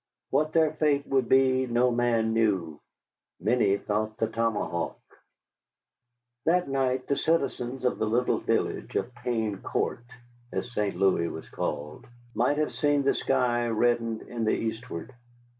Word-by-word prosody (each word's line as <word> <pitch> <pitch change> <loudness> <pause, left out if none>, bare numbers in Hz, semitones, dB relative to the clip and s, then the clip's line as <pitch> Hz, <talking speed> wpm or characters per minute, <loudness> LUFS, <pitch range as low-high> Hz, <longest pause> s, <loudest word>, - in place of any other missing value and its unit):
What 155 +3 +1
their 160 -2 +4
fate 150 -2 +1
would 135 -3 +1
be 130 -1 +4
no 120 +1 +2
man 120 -2 +1
knew. 95 -9 +1 0.6
Many 105 0 +2
thought 110 +1 -2
the - - +1
tomahawk. 110 -6 -1 1.5
That 180 +1 +2
night 130 -1 0
the 140 - 0
citizens 135 -6 -1
of 125 - +1
the 110 - +1
little 120 +3 +1
village - - -1
of 125 - -1
Pain 115 -5 -2
Court, 120 - -2 0.5
as 125 - -3
St. 105 -3 -1
Louis 95 -2 +2
was 80 - -7
called, 75 +1 -4 0.3
might 125 +6 +1
have 155 0 0
seen 145 -1 +2
the 135 - +3
sky 120 -1 +1
reddened 115 0 +1
in 115 -1 -5
the 110 - +2
eastward. 110 -2 -5
120 Hz, 140 wpm, -27 LUFS, 110-130 Hz, 1.5 s, their